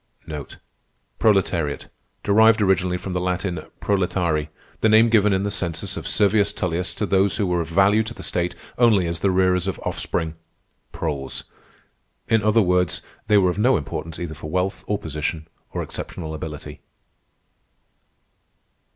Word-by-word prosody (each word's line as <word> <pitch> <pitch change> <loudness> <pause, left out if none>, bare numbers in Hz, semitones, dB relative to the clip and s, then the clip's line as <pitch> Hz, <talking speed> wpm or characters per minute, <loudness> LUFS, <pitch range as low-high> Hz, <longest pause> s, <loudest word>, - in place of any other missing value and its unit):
Proletariat: 95 -8 +1 0.4
Derived 110 +2 +5
originally 90 -3 +2
from 90 +1 -6
the 90 - -1
Latin 90 -1 -1 0.2
proletarii, 90 -6 0 0.3
the 110 - +3
name 110 +2 +6
given 105 -2 +4
in 95 0 +1
the 100 - -1
census 85 -5 -3
of - - -5
Servius 105 0 +3
Tullius 90 +1 -2
to 105 - -1
those 95 -2 +2
who 100 - +1
were 90 -2 +1
of 80 - -4
value 100 +5 +4
to 110 +1 -4
the - - -8
state 90 0 -1 0.2
only 110 -7 +5
as 85 0 -3
the 100 - +2
rearers 90 -1 +2
of 95 - -2
offspring 80 -1 -2 0.6
(proles); 70 -2 -4 0.8
in 110 -1 +3
other 110 +1 +4
words, 90 -1 +1 0.2
they 105 -1 +5
were 90 -2 +4
of 95 - -5
no 125 +5 +4
importance 80 +2 -5
either 85 -3 -5
for 75 0 -8
wealth, 90 +3 -1
or 105 - 0
position, 80 -1 -4 0.2
or - - -3
exceptional 80 -3 -6
ability. 75 -1 -7
90 Hz, 150 wpm, -23 LUFS, 85-105 Hz, 0.8 s, name